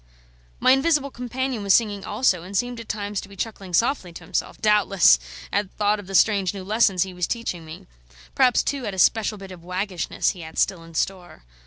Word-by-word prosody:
My 255 - +5
invisible 280 +1 +2
companion 250 -1 -3
was 200 -1 +4
singing 205 -4 0
also, 185 -9 +1
and 190 +3 -4
seemed 245 +1 -2
at 230 - -10
times 205 -1 -3
to 195 - -12
be 200 - -13
chuckling 195 -2 -5
softly 230 - +1
to - - -10
himself, 190 - -3
doubtless 200 - +4 0.3
at 205 -1 0
thought 210 0 +1
of 200 - -10
the 195 - -5
strange 200 -2 +3
new 190 - -6
lessons 200 -3 +2
he 190 -1 -8
was 180 -1 -2
teaching 230 -8 -3
me; 155 0 -10 0.5
perhaps, 255 -2 +3
too, 270 -5 -2
at 200 - -4
a - - -10
special 215 +3 +3
bit 195 -1 -10
of 175 -2 -11
waggishness 180 0 -1
he 180 - -10
had 160 0 -10
still 185 -4 +1
in 165 0 -14
store. 175 - -3
200 Hz, 210 wpm, -23 LUFS, 185-230 Hz, 0.5 s, My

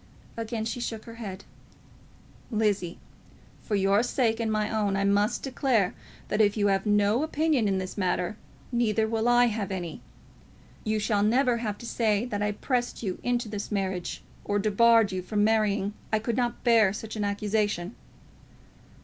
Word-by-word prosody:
Again 225 -1 -3
she 230 - -3
shook 225 -2 -4
her 230 - -9
head. 195 -2 -6 1.1
"Lizzie, 205 -6 0 0.6
for 210 - -2
your 195 +1 +3
sake 235 -2 0
and 225 -1 0
my 215 -1 +1
own, 210 -3 0
I 200 - +1
must 205 +3 +2
declare, 250 -7 +1 0.4
that 210 - +2
if 205 0 +3
you 205 -1 +3
have 195 +2 -1
no 205 +3 +3
opinion 310 -6 +1
in 195 -1 +1
this 185 +2 -5
matter, 180 +1 0 0.4
neither 225 -2 +1
will 225 +1 0
I 245 0 +6
have 215 -4 -2
any. 175 -4 -5 0.8
You 215 -1 0
shall 210 -1 +1
never 240 +3 +3
have 215 -3 -3
to 235 - -10
say 225 -2 +1
that 205 -4 -3
I 210 0 +1
pressed 245 +2 -2
you 190 -4 -3
into 245 -1 0
this 205 0 -5
marriage 190 -3 -2 0.2
or 205 - 0
debarred 220 +1 +4
you 185 -1 -2
from 205 +3 0
marrying. 210 -2 +2 0.2
I 220 - +3
could 225 +1 -2
not 240 -2 -1
bear 225 -5 +5
such 220 +1 -6
an 210 - -2
accusation." 205 -2 -1
215 Hz, 170 wpm, -27 LUFS, 200-230 Hz, 1.1 s, I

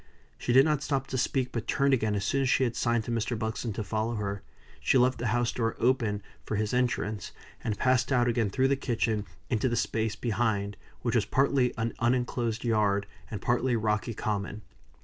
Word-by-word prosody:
She - - -1
did 135 +3 +7
not 150 -3 +1
stop 135 -3 -1
to - - -3
speak, 125 +1 0
but 115 -1 -4
turned 140 0 +2
again 110 -4 +1
as 100 -1 -1
soon 135 +6 +1
as 135 - +1
she 130 - +3
had 120 -2 0
signed 120 -1 +1
to 120 - -5
Mr. 115 +1 -1
Buxton 110 +1 -2
to 110 - -3
follow 110 +3 -1
her. 100 -2 -3 0.4
She - - +3
left 125 0 +3
the 120 - -1
house 120 +2 +1
door 115 -2 -1
open 115 -5 +1 0.2
for - - -3
his 105 +2 -1
entrance, 115 -5 -1 0.3
and 110 -2 -1
passed 130 0 +2
out 120 -2 +3
again 115 -3 +1
through 130 +6 +2
the 140 - +3
kitchen 115 -5 -1 0.3
into 120 +2 +2
the 120 - 0
space 110 -1 0
behind, 110 -3 -1 0.3
which 120 - 0
was 115 -4 +3
partly 135 -2 +2
an 115 0 -1
uninclosed 120 -1 0
yard, 105 -4 +2 0.2
and 105 -4 -6
partly 120 +1 +2
rocky 110 0 0
common. 105 -2 -3
115 Hz, 205 wpm, -29 LUFS, 110-125 Hz, 0.4 s, did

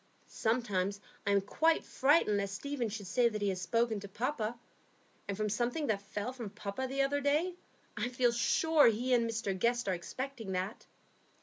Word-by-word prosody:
Sometimes 205 -4 0 0.3
I - - +4
am 200 0 +4
quite 320 +11 +2
frightened 265 -7 +3
lest 200 0 -2
Stephen 265 0 -2
should 205 -1 -6
say 235 +5 +3
that 215 -2 -4
he 205 -1 +1
has 185 -1 -2
spoken 230 +3 +1
to 200 - -8
papa; 235 +1 -2 0.7
and 200 -1 -3
from 215 0 0
something 240 +8 0
that 210 -5 0
fell 210 +4 -4
from 235 -5 -6
papa 210 +5 -4
the 275 +1 +1
other 285 +1 0
day, 300 +6 +2 0.4
I 245 - -1
feel 245 -1 +2
sure 290 +6 +4
he 240 +3 +2
and 235 -2 +3
Mr 220 -4 -2
Guest 235 +4 +1
are 190 - +2
expecting 225 +4 -5
that. 185 +4 -3
230 Hz, 185 wpm, -33 LUFS, 200-255 Hz, 0.7 s, I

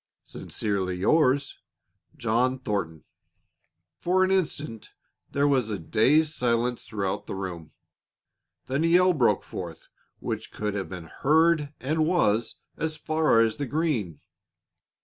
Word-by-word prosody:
"Sincerely 95 -3 -3
yours, 140 - +2 0.6
"JOHN 120 +3 +1
THORNTON." 100 -10 -3 1.0
For 185 +2 +2
an 185 - +1
instant 155 - -2 0.3
there 140 +1 +1
was 130 -6 +2
a 105 - -2
dazed 135 - +2
silence 120 -2 0
throughout 100 -3 -3
the - - -4
room. 90 -5 -6 0.9
Then 135 +4 -1
a - - +3
yell 180 +2 +5
broke 130 -7 +2
forth - - -8 0.3
which - - -5
could 105 -1 -3
have 95 -5 -4
been 90 -3 -7
heard 150 - +2
and 155 +4 0
was 115 - +1 0.2
as 155 -1 -3
far 155 -8 +2
as 115 -1 +1
the 145 - -3
green. 125 - -1
130 Hz, 130 wpm, -26 LUFS, 105-155 Hz, 1.0 s, yell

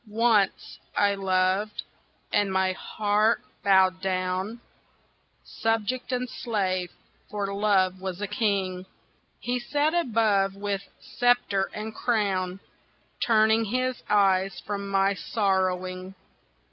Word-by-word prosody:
ONCE 215 -1 +1 0.2
I 200 0 +4
loved, 190 +2 0 0.5
and 205 -2 +2
my 190 0 +2
heart 210 +3 +1 0.2
bowed 190 -2 +4
down, 185 +3 -2 0.8
Subject 225 +3 -2
and 250 0 -1
slave, 190 -8 -2 0.4
for 200 -1 -3
Love 190 -2 +2
was 190 -1 -4
a 205 - -2
King; 195 -3 -1 0.5
He 245 +1 -2
sat 290 +5 0
above 220 - +2
with 200 -1 -2 0.2
sceptre 245 -6 +1
and 215 +1 -6
crown, 195 -5 -1 0.6
Turning 220 0 +4
his 255 +3 -1
eyes 195 -2 +3
from 200 -1 -4
my 195 0 +2
sorrowing. 185 0 -1
200 Hz, 105 wpm, -26 LUFS, 190-220 Hz, 0.8 s, I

